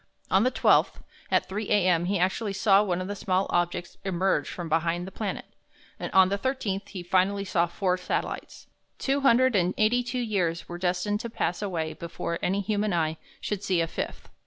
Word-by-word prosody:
On 190 - +5
the 250 - +3
12th, 255 - +3 0.4
at - - +2
3 205 +2 -4
A.M., 180 -4 +3
he 195 +2 +1
actually 190 +3 0
saw 195 0 +4
one 185 -3 -1
of 185 - -4
the 205 - -4
small 190 -1 0
objects 175 0 -1
emerge 190 0 0
from 175 -2 -5
behind 165 +2 0
the 190 - -8
planet; 210 -1 -4 0.5
and - - -4
on 190 -1 +6
the 200 +1 -1
13th 210 -7 -2
he 185 -3 -6
finally 190 +2 +1
saw 175 -2 +1
four 180 +1 0
satellites. 180 - -4 0.3
Two 275 +1 0
hundred 260 -2 +4
and 180 -1 +2
eighty 225 +3 +3
two 245 +1 -4
years 190 -8 -1
were 175 0 -7
destined 185 +3 0
to 235 +1 -5
pass 180 -5 -2
away 165 -6 -2
before 170 +1 -4
any 195 +2 0
human 205 0 0
eye 160 -2 0 0.2
should 205 -1 -3
see 185 -3 +1
a 165 - +2
fifth. 165 - -5
190 Hz, 195 wpm, -27 LUFS, 175-210 Hz, 0.5 s, on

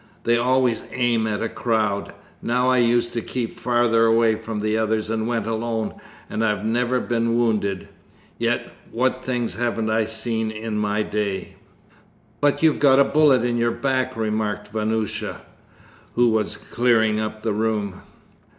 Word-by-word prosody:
They 120 - +3
always 125 -1 +2
aim 120 -3 +1
at 105 0 -2
a - - 0
crowd. 110 -4 -1 0.3
Now 125 +2 +1
I 130 - +3
used 120 0 +2
to 115 - -2
keep 120 0 -4
farther 120 -2 +3
away 115 0 +4
from 110 -1 -5
the 110 0 0
others 110 0 0
and 110 0 -1
went 115 -3 -1
alone, 115 -1 -2 0.3
and 110 - -2
I've 105 -1 0
never 120 +3 +1
been 115 -1 0
wounded. 105 -5 0 0.5
Yet - - -1 0.2
what 130 +2 0
things 120 -6 -2
haven't 115 0 -1
I 110 0 +2
seen 110 0 -2
in 110 0 -5
my 105 0 0
day?' 100 -2 -3 0.9
'But 145 +2 +1
you've 160 -2 +4
got 135 -2 +5
a 140 - +7
bullet 140 -4 +4
in 120 -1 0
your 120 0 +2
back,' 130 -1 -1
remarked 105 -1 -2
Vanyusha, 110 -1 -2 0.7
who 120 0 +4
was 110 -1 0
clearing 110 -3 +1
up 110 0 -4
the 110 - 0
room. 105 -3 -1
115 Hz, 160 wpm, -22 LUFS, 110-120 Hz, 0.9 s, a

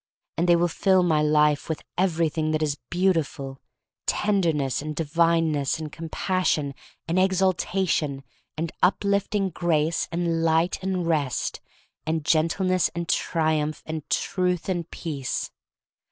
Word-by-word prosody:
And 175 +2 0
they 175 - +7
will 170 +1 +3
fill 185 +1 +3
my 160 -3 +3
life 150 0 +3
with 160 - -3
every 170 -3 +2
thing 155 0 -1
that 155 0 +1
is 145 -1 -1
beautiful 160 -7 0 0.2
— - - -64
tenderness, 165 -11 +1
and 150 0 -5
divineness, 165 -2 +1
and 155 -2 -6
compassion, 165 -2 -1 0.3
and 170 +3 +1
exalta 190 0 +1
tion, 140 -5 -1 0.3
and 165 +1 -2
uplifting 200 +1 +1
grace, 165 -1 0
and 165 -1 0
light, 165 +2 +2
and 185 -2 -1
rest, 150 -6 -1 0.4
and 160 -1 -2
gentleness, 175 +3 +2
and 170 0 -3
triumph, 155 -3 0
and 155 -2 -6
truth, 180 -2 0
and 175 -3 -2
peace. 140 -6 -4
165 Hz, 135 wpm, -25 LUFS, 155-180 Hz, 0.4 s, they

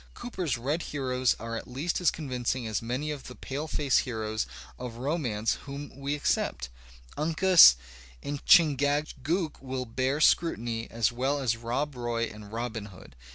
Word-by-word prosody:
Cooper's 185 - -3
red 145 +8 -1
heroes 130 -4 0
are 115 +1 -5
at 115 - -6
least 145 +9 -2
as 175 - +5
convincing 130 -4 -3
as 110 -2 -2
many 125 +6 -2
of 145 -3 -7
the 125 - -9
paleface 145 0 0
heroes 110 -2 -2 0.3
of 125 -2 -6
romance 125 -6 -1
whom 140 +1 -6
we 140 +1 -2
accept. 65 - -1 0.5
TJncas 165 - +7 0.5
and 145 -1 -4
Chingachgook 150 +1 +3
will 130 -1 -4
bear 130 +4 -1
scrutiny 120 -9 +2
as 115 -1 +1
well 130 +4 0
as 130 -5 0
Rob 125 +6 -2
Roy 120 -1 -2
and 105 -2 -7
Robin 115 -2 -4
Hood. 95 - -14
130 Hz, 150 wpm, -28 LUFS, 115-145 Hz, 0.5 s, TJncas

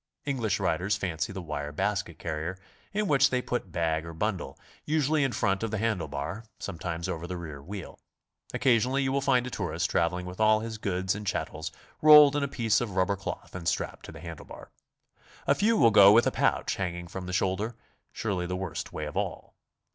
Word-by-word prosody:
English 115 -9 0
riders 90 +5 +1
fancy 85 -4 -2
the 95 -2 -6
wire 75 -2 -4
basket 75 - -2
carrier, 80 +3 -4 0.3
in 210 0 0
which 135 -4 +5
they 125 - +1
put 120 -7 -3
bag 80 -1 0
or 85 0 -8
bundle, 100 +1 -2 0.3
usually 155 0 +2
in 135 - +1
front 100 -3 0
of 115 - -1
the 110 - -2
handle 105 -6 0
bar, 70 +10 -5
sometimes 85 -2 -4
over 85 -2 -4
the 90 - -4
rear 75 -5 -7
wheel. 95 +5 -8 0.5
Occasionally 130 +2 +2
you 130 - 0
will 140 +1 +1
find 130 -3 +3
a 125 - -5
tourist - - -2
traveling 90 +2 +1
with 90 +2 -8
all 110 0 +4
his 110 -1 -5
goods 95 -2 0
and 105 0 -6
chattels 80 -4 -3 0.3
rolled 150 -2 +9
in 145 - +1
a 140 - 0
piece 115 -4 +1
of 105 -6 -4
rubber 95 +1 +2
cloth 95 - -6
and 90 -2 -6
strapped 80 - -2
to - - -9
the 80 -1 -11
handle 85 -2 -8
bar. - - -11 0.7
A - - +4
few 220 +3 +2
will 115 - +6
go 100 -1 +9
with 115 +3 +6
a - - +2
pouch - - +1
hanging 85 -2 -3
from 90 +1 -7
the - - -4
shoulder, 95 +5 0 0.4
surely 95 -5 -2
the 90 - -2
worst 95 -3 -5
way - - -4
of - - -7
all. - - -3
95 Hz, 210 wpm, -28 LUFS, 85-120 Hz, 0.7 s, rolled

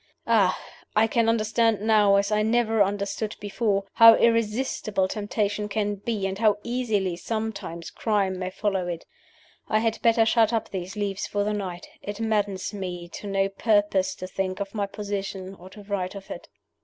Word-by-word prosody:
Ah! 205 -5 +3 0.4
I 215 +1 +5
can 225 0 +2
understand 225 0 +2
now, 210 -2 +4
as 200 +1 +1
I 210 0 +2
never 225 0 +2
understood 200 +2 -1
before, 205 -1 0
how 230 0 +9
irresistible 225 -3 +1
temptation 210 0 -2
can 205 -1 -1
be, 205 0 -3
and 195 +1 -3
how 215 -2 +4
easily 220 -7 -1
sometimes 200 -4 -4
crime 195 -4 0
may 185 0 -2
follow 190 -2 -1
it. 170 -2 -5 0.6
I 215 - +3
had 225 0 0
better 230 -1 +4
shut 225 -1 +3
up 225 - -1
these 185 0 -5
leaves 200 -2 -2
for 205 0 -1
the 210 +1 -1
night. 185 -4 -5
It 205 +1 -6
maddens 205 -3 -1
me 180 -3 -5
to 205 - -8
no 195 0 +1
purpose 195 -2 +1
to - - -7
think 185 +1 -3
of 200 -1 -4
my 205 -2 -1
position 195 -2 -5
or 185 -1 -13
to 205 +2 -12
write 200 -1 -3
of 195 -1 -9
it." 175 - -8
205 Hz, 175 wpm, -25 LUFS, 195-220 Hz, 0.6 s, how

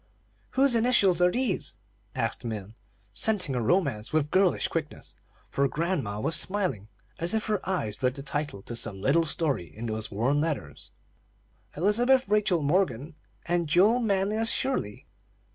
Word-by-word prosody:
"Whose 270 -1 +4
initials 220 -7 +4
are 180 - +5
these?" 245 -5 -1 0.4
asked - - -2
Min, 110 -3 -5 0.4
scenting 195 - 0
a 125 - -1
romance 130 - 0
with 155 -1 0
girlish 190 -1 +2
quickness, 155 -2 -5 0.4
for 140 0 +1
grandma 150 - -2
was 160 +9 0
smiling 185 - -1 0.3
as 170 +5 +1
if 220 - -1
her 210 -2 0
eyes 110 - -2
read 125 0 +1
the 140 - -7
title 145 -8 -4
to 120 - -7
some 105 -4 0
little 150 +10 +2
story 145 - 0
in 110 +7 -9
those 110 -1 -3
worn 120 +8 0
letters. 145 - -4 0.9
"Elizabeth 245 - +3
Rachel 200 -6 +2
Morgan, 150 -2 0 0.3
and 170 -2 0
Joel 200 +9 +4
Manlius 215 0 +2
Shirley. 255 - 0
165 Hz, 145 wpm, -27 LUFS, 120-200 Hz, 0.9 s, are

